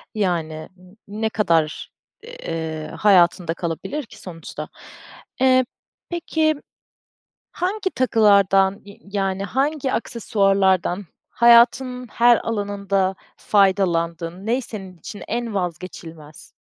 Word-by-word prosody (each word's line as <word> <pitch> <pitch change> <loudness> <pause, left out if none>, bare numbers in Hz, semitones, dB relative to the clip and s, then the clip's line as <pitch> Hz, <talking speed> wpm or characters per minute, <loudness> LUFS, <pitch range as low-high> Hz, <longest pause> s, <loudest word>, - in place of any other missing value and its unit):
yani, 165 -6 -2
n 185 +3 -19 0.2
ne 220 - +1
kadar, 165 -8 0 0.3
eee, 165 - -5
hayatında 180 -4 +4
kalabilir 170 - -4
ki - - -15
sonuçta. 165 -3 -8 0.7
Eee, 255 -1 +5 0.4
peki, 320 -2 0 1.0
hangi 375 +2 -2
takılardan, 200 - +3
i 200 0 -14 0.2
yani, 195 0 -1
hangi 270 +6 -1
aksesuarlardan 195 -5 +1 0.2
hayatının 250 +2 +4
her 240 +1 +5
alanında 200 -3 -1 0.2
faydalandın? 180 -3 +1
Ne 240 +4 +1
senin 195 -6 -9
için 205 +5 -9
en 235 -1 -3
vazgeçilmez? 165 -4 -6
200 Hz, 95 wpm, -22 LUFS, 180-235 Hz, 1.0 s, Eee